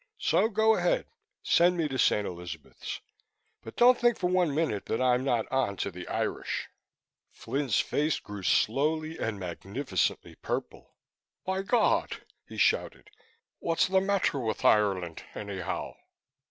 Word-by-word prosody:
So, 220 Hz, -, +2 dB
go 220 Hz, 0 st, +3 dB
ahead, -, -, +1 dB, 0.4 s
send 175 Hz, +1 st, +4 dB
me 165 Hz, -2 st, +1 dB
to 135 Hz, -2 st, -4 dB
St. 105 Hz, -2 st, +3 dB
Elizabeth's 85 Hz, -4 st, -7 dB, 0.6 s
but 115 Hz, -, -10 dB
don't 245 Hz, +1 st, +6 dB
think 240 Hz, -1 st, +3 dB
for 180 Hz, -, -1 dB
one 180 Hz, -4 st, +2 dB
minute 150 Hz, -11 st, -1 dB
that -, -, -1 dB
I'm 125 Hz, 0 st, +2 dB
not 120 Hz, -5 st, +1 dB
on 130 Hz, -7 st, 0 dB
to 100 Hz, -, -2 dB
the 90 Hz, 0 st, -9 dB
Irish." -, -, -3 dB, 0.6 s
Flynn's 135 Hz, -5 st, -1 dB
face 150 Hz, +1 st, 0 dB
grew 105 Hz, -1 st, -8 dB
slowly 155 Hz, -, +1 dB
and 110 Hz, -3 st, -2 dB
magnificently 95 Hz, +4 st, -2 dB
purple. -, -, -5 dB, 0.5 s
"By 190 Hz, +1 st, -1 dB
God!" 220 Hz, +3 st, +1 dB, 0.2 s
he -, -, -10 dB
shouted. 420 Hz, -, 0 dB, 0.5 s
"What's 165 Hz, -1 st, +1 dB
the 190 Hz, 0 st, +3 dB
matter 195 Hz, -7 st, +1 dB
with 110 Hz, -3 st, -3 dB
Ireland, 95 Hz, -6 st, +2 dB
anyhow?" 100 Hz, -3 st, -4 dB
135 Hz, 140 wpm, -29 LUFS, -, 0.6 s, don't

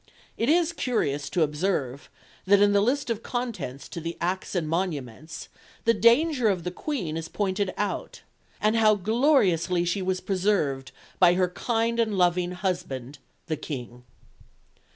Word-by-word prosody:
It 230 Hz, -, 0 dB
is 340 Hz, +1 st, +3 dB
curious 145 Hz, -, -1 dB
to 170 Hz, -, +2 dB
observe 150 Hz, -4 st, -2 dB, 0.4 s
that 200 Hz, +1 st, +5 dB
in 205 Hz, 0 st, +5 dB
the 200 Hz, -, +4 dB
list 250 Hz, +3 st, 0 dB
of 225 Hz, -1 st, -2 dB
contents 215 Hz, -, -4 dB
to 170 Hz, -, -6 dB
the 165 Hz, +1 st, -5 dB
Acts 185 Hz, +3 st, -2 dB
and 170 Hz, -4 st, 0 dB
Monuments 155 Hz, -5 st, -4 dB, 0.4 s
the 230 Hz, -, +5 dB
danger 240 Hz, +4 st, +4 dB
of 185 Hz, -5 st, +1 dB
the 180 Hz, -, -3 dB
Queen 185 Hz, -, -3 dB
is 165 Hz, 0 st, -5 dB
pointed 195 Hz, -1 st, -1 dB
out, 205 Hz, -, -3 dB, 0.4 s
"and 215 Hz, +1 st, +2 dB
how 215 Hz, -2 st, +5 dB
gloriously 195 Hz, -, +2 dB
she 175 Hz, +3 st, -1 dB
was 185 Hz, 0 st, -1 dB
preserved 180 Hz, -10 st, 0 dB, 0.3 s
by 175 Hz, -1 st, +6 dB
her 180 Hz, -1 st, +2 dB
kind 230 Hz, +4 st, -1 dB
and 220 Hz, -3 st, +1 dB
loving 180 Hz, 0 st, +2 dB
Husband 145 Hz, -8 st, -4 dB, 0.3 s
the 155 Hz, -2 st, -2 dB
King." 125 Hz, -5 st, -7 dB
185 Hz, 150 wpm, -26 LUFS, 165-220 Hz, 0.4 s, by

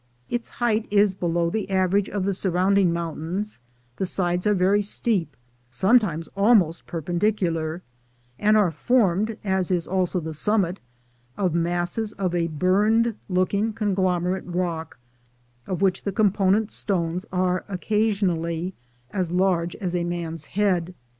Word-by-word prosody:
In 240 Hz, 0 st, 0 dB
height 230 Hz, -2 st, 0 dB
it 205 Hz, -, 0 dB
is 200 Hz, -1 st, +5 dB
below 170 Hz, -2 st, 0 dB
the 215 Hz, 0 st, -2 dB
average 190 Hz, +1 st, +2 dB
of 200 Hz, -2 st, -2 dB
the 200 Hz, -, +1 dB
surround 190 Hz, +1 st, +2 dB
ing 180 Hz, -3 st, +3 dB
mountains; 170 Hz, +4 st, -4 dB, 0.4 s
the 190 Hz, -, -1 dB
sides 180 Hz, +1 st, +1 dB
are 210 Hz, -, +3 dB
very 195 Hz, +3 st, +3 dB
steep, 195 Hz, -7 st, -1 dB, 0.3 s
sometimes 175 Hz, -, +2 dB
almost 200 Hz, -6 st, +3 dB
perpendicular, 170 Hz, -1 st, -1 dB, 0.6 s
and 215 Hz, +1 st, +4 dB
are 200 Hz, -5 st, +3 dB
formed, 215 Hz, -, +1 dB
as 190 Hz, -3 st, 0 dB
is 175 Hz, -3 st, 0 dB
also 185 Hz, 0 st, 0 dB
the 160 Hz, -1 st, -5 dB
summit, 190 Hz, +2 st, 0 dB, 0.6 s
of 185 Hz, -5 st, 0 dB
masses 175 Hz, +5 st, -1 dB
of 185 Hz, -3 st, -2 dB
a 170 Hz, -1 st, +1 dB
burned 205 Hz, +8 st, +2 dB, 0.2 s
looking 200 Hz, +4 st, +1 dB
conglomerate 185 Hz, -4 st, 0 dB
rock, 170 Hz, -4 st, -3 dB, 0.7 s
of 185 Hz, 0 st, -2 dB
which 190 Hz, -2 st, +2 dB
the 200 Hz, -, -1 dB
component 205 Hz, 0 st, +2 dB
stones 180 Hz, -1 st, -2 dB
are 180 Hz, 0 st, 0 dB
occasionally 185 Hz, -4 st, 0 dB, 0.4 s
as 185 Hz, -4 st, -1 dB
large 180 Hz, -1 st, +1 dB
as 180 Hz, -3 st, -4 dB
a 175 Hz, -1 st, 0 dB
man's 165 Hz, -2 st, -4 dB
head. 180 Hz, -4 st, +1 dB
185 Hz, 140 wpm, -24 LUFS, 170-205 Hz, 0.7 s, is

